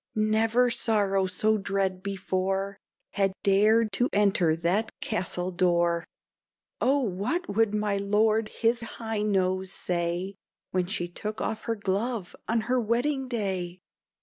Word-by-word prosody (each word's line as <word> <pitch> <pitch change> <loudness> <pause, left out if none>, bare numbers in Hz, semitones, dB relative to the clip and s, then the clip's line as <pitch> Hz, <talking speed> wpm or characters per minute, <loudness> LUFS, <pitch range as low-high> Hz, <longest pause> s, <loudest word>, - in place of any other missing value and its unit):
Never 220 +3 +2
sorrow 200 -5 +2
so 215 +4 +1
dread 195 -1 -1
before 195 0 -2 0.3
Had 195 -1 +1
dared 215 +3 +4
to 245 +6 +1
enter 190 -6 +3
that 180 +7 0
castle 185 -3 -2
door. 175 -1 +2 0.7
Oh! 275 +2 +3
what 230 - -2
would 220 -1 +2
my 210 -1 0
Lord 215 +2 +2
His 235 +1 0
High 225 -1 -4
Nose 190 -2 0
say 175 +1 -2 0.4
When 180 -1 0
she 175 -2 -2
took 215 +5 -6
off 220 0 -3
her 230 - 0
glove 205 0 -2
on 225 0 +1
her 245 +3 +1
wedding 260 +5 0
day? 190 -7 -2
200 Hz, 130 wpm, -27 LUFS, 185-225 Hz, 0.7 s, dared